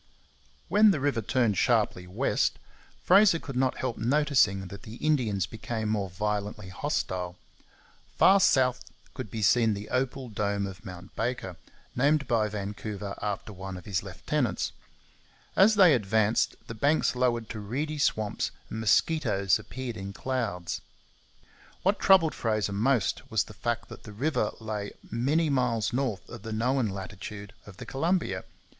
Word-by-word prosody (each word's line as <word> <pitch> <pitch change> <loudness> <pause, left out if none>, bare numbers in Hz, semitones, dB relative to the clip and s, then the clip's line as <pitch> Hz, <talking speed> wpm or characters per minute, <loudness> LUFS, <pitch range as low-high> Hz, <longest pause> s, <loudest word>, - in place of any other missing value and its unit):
When 215 +1 +6
the 180 -7 +2
river 140 -4 0
turned 110 -3 +1
sharply 90 0 +1
west, 90 - 0 0.5
Fraser 200 -4 +6
could 140 -5 -8
not 130 0 +1
help 130 -3 -3
noticing 120 -6 +2
that 100 - -9
the 110 - -10
Indians 120 - +1
became 110 +2 -4
more 100 -3 -1
violently 105 +1 -3
hostile. 90 -6 -2 0.8
Far 195 +1 +7
south 125 -7 +3 0.3
could 130 -5 -6
be 110 +1 -4
seen 115 +1 +4
the 100 +1 -7
opal 130 0 -1
dome 100 -1 -1
of 95 0 -8
Mount 90 -1 -10
Baker, 120 -7 -2 0.4
named 140 +2 +2
by 110 -2 +2
Vancouver 105 0 -5
after 105 0 -3
one 95 0 -7
of 90 - -11
his 95 -6 -1
lieutenants. - - -2 0.8
As 210 +3 +6
they 185 -6 +7
advanced, 110 -1 +2
the - - -7
banks 140 +5 +2
lowered 120 -3 +1
to 110 - -5
reedy 145 +9 -3
swamps 110 -6 0 0.2
and 110 - -4
mosquitoes 110 - +2
appeared 120 +2 -6
in 100 0 -6
clouds. 110 -8 -3 1.0
What 195 +2 +2
troubled 185 -5 +5
Fraser 110 -3 -1
most 115 +2 +1
was - - +2
the - - -13
fact 120 -1 -2
that - - -10
the 105 - -11
river 130 -1 0
lay 105 -2 -4 0.2
many 145 +7 +1
miles 125 -4 +1
north 125 -7 -2
of 120 -3 -9
the 110 - -7
known 125 +2 +1
latitude 100 +1 -7
of 100 -2 -12
the - - -8
Columbia. 170 +6 -1
110 Hz, 150 wpm, -28 LUFS, 100-135 Hz, 1.0 s, Far